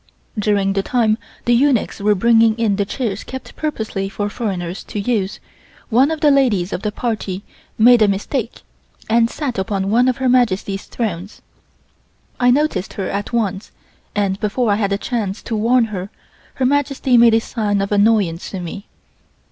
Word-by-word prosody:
During 200 -2 +1
the 195 - +1
time 220 0 +1 0.3
the 240 - +3
eunuchs 255 -1 +2
were 205 +1 +2
bringing 225 +2 +4
in 215 -4 +1
the 200 - 0
chairs 215 -1 -3
kept 260 0 -9
purposely 220 -10 -3
for 205 +1 -3
foreigners 190 -6 -4
to 210 - -5
use, 200 -2 -1 0.5
one 255 +5 +4
of 320 -1 -3
the 295 - +5
ladies 220 -10 +2
of - - -3
the 210 - -2
party 205 -4 -3 0.3
made 235 +1 +6
a 215 - +6
mistake 215 +5 -3 0.5
and 230 0 +4
sat 260 -8 -3
upon 195 0 -1
one 245 +3 +4
of 255 - +1
Her 265 - 0
Majesty's 205 -6 +1
thrones. 200 -4 -5 1.0
I 245 0 +4
noticed 250 -8 +1
her 195 - -3
at 200 +1 -3
once, 210 -4 -2 0.4
and 200 -1 0
before 215 +2 0
I - - +3
had 200 -2 -1
a 200 - +1
chance 210 -3 -3
to 225 - -3
warn 230 +3 +3
her, 190 +1 -4 0.5
Her 260 - 0
Majesty 275 -1 +1
made 235 -1 +6
a - - +4
sign 210 -3 -2
of 195 +1 -2
annoyance 205 -5 +2
to 190 - -5
me. 180 +4 -7
215 Hz, 175 wpm, -19 LUFS, 195-245 Hz, 1.0 s, made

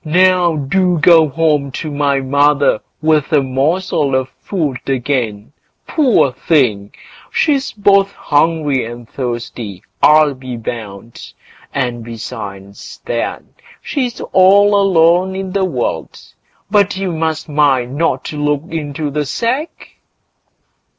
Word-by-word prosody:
Now 180 +1 +3
do 175 +5 +1
go 160 0 +5
home 150 -1 0
to 155 +1 -5
my 140 -1 0
mother 140 -2 +2 0.2
with 155 -2 +2
a 145 -3 +3
morsel 145 +2 0
of 130 0 -1
food 150 -3 -4
again; 120 -4 -2 0.3
poor 255 - +2
thing! 125 -8 0 0.4
she's 280 -4 +1
both 200 -1 +3
hungry 145 -3 +1
and 120 0 -8
thirsty, 120 -6 -5 0.2
I'll 150 -1 +5
be 130 -2 -8
bound; 115 -1 -8 0.4
and 120 -3 -2
besides 105 -4 -8
that, - - -3 0.4
she's 250 -5 -3
all 200 +2 +5
alone 185 -1 +3
in 190 -1 -4
the 195 0 0
world. 130 -10 -3 0.5
But 205 -2 +2
you 190 -2 -2
must 160 -1 -2
mind 145 -5 +2
and 135 - -7
not 165 - -1
look 145 -1 -1
into 150 -2 -4
the 150 0 -2
sack." 255 - -3
150 Hz, 120 wpm, -16 LUFS, 130-180 Hz, 0.5 s, go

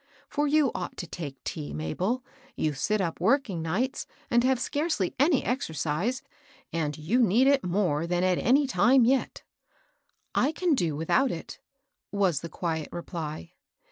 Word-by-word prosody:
For 295 0 0
you 290 -3 +3
ought - - -5
to 175 - -4
take 145 -5 -7
tea, 150 -2 -5
Mabel; 185 - -2 0.3
you 155 -1 0
sit 205 +10 0
up 170 -3 -2
working 215 - +2
nights, 195 +12 -1 0.2
and 240 0 +4
have 260 -1 +2
scarcely 290 - -1
any 285 0 +4
exercise, 195 - -1 0.5
and 150 -3 -1
you 185 +12 +1
need 230 +4 +4
it 275 -1 +4
more 175 -4 0
than 175 +1 0
at 185 -1 +2
any 280 +4 +4
time 245 +2 +4
yet." 265 +2 0 0.5
" - - -46
I 305 - -1
can 350 0 +1
do 170 - 0
without 210 - +2
it," 165 - -6 0.5
was 190 -7 +2
the 170 - -6
quiet 160 -1 -3
reply. 170 -1 -6
190 Hz, 160 wpm, -27 LUFS, 165-260 Hz, 0.5 s, and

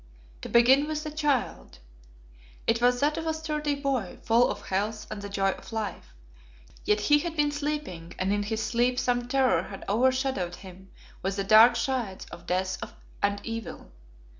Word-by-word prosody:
To - - -7
begin 260 +5 +5
with 305 -1 -3
the 305 - -5
child. 295 -4 -1 0.9
It 230 +1 +1
was 245 0 +3
that 300 +2 +1
of 325 - -5
a 320 - 0
sturdy 300 -2 -2
boy, 270 -8 -2
full 235 +2 +4
of 205 - -5
health 210 +3 -1
and 210 -1 -5
the 200 - -6
joy 195 -1 +1
of - - -11
life. 210 - -5 0.7
Yet 210 0 +2
he 295 +8 +4
had 335 +1 -4
been 295 -1 +2
sleeping, 290 - -4
and 190 +2 0
in 205 - 0
his 220 +2 -2
sleep 245 +2 +1
some 245 -1 0
terror 260 0 +3
had 195 - -9
over 240 +6 +3
shadowed 255 -10 -2
him 190 0 -13 0.3
with 195 +1 -2
the 200 - -1
dark 220 +4 +7
shades 235 -5 -2
of 175 0 -11
death 185 +1 -1 0.4
and 200 0 +1
evil. 230 - -6
235 Hz, 180 wpm, -27 LUFS, 200-280 Hz, 0.9 s, dark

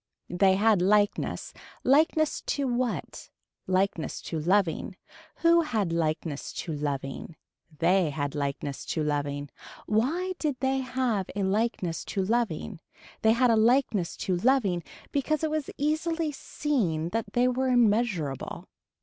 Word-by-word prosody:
They 190 +1 +4
had 210 -1 +3
likeness. 205 +2 +1 0.3
Likeness 310 +3 +3
to 280 -2 0
what. 245 -1 -2 0.4
Likeness 185 -3 0
to 160 - -3
loving. 180 +1 +1 0.5
Who 335 0 +6
had 215 - -1
likeness 155 -2 -2
to 165 - -4
loving. 145 +1 -4 0.4
They 175 +1 +3
had 145 -1 -3
likeness 140 -1 -3
to 160 - -1
loving. 145 -1 -2 0.3
Why 310 - 0
did 300 -4 0
they 265 +1 +1
have 255 -6 -1
a 200 - -1
likeness 190 -4 -1
to 195 - -2
loving. 220 -4 -1 0.4
They 220 0 +5
had 240 +1 +3
a - - +4
likeness 225 -5 +2
to 185 - +1
loving 205 -5 +2 0.3
because 300 +2 0
it 315 - 0
was 310 -2 -2
easily 315 +2 0
seen 210 - -1
that 215 0 -3
they 245 +1 +3
were 255 +1 0
immeasurable. 215 - +1
210 Hz, 130 wpm, -27 LUFS, 170-260 Hz, 0.5 s, Who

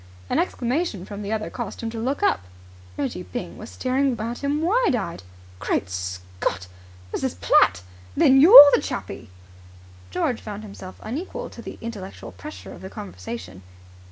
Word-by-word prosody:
An - - +2
exclamation 250 - -1
from 205 0 -7
the 205 0 -4
other 220 -1 -2
caused 240 -5 -6
him 225 - -2
to 225 - -5
look 265 - -2
up. - - +3 0.6
Reggie 145 +6 -2
Byng 245 +7 -7
was 215 - -8
staring 260 -1 0
at 235 +4 -4
him, 290 +2 0
wide 425 - +3
eyed. 180 - -4 0.4
"Great 95 -2 -1
Scott! 90 0 -4 0.5
Mrs. 85 - -2
Platt! 90 0 +4 0.3
Then 270 0 +6
you're 300 - +12
the - - +4
Chappie?" - - -6 0.8
George 225 - -1
found 210 0 -7
himself 195 -3 -10
unequal 360 - -5
to - - -10
the - - -8
intellectual 210 -5 -7
pressure 305 +1 -10
of - - -12
the 190 - -7
conversation. 95 - -8
220 Hz, 155 wpm, -24 LUFS, 170-270 Hz, 0.8 s, you're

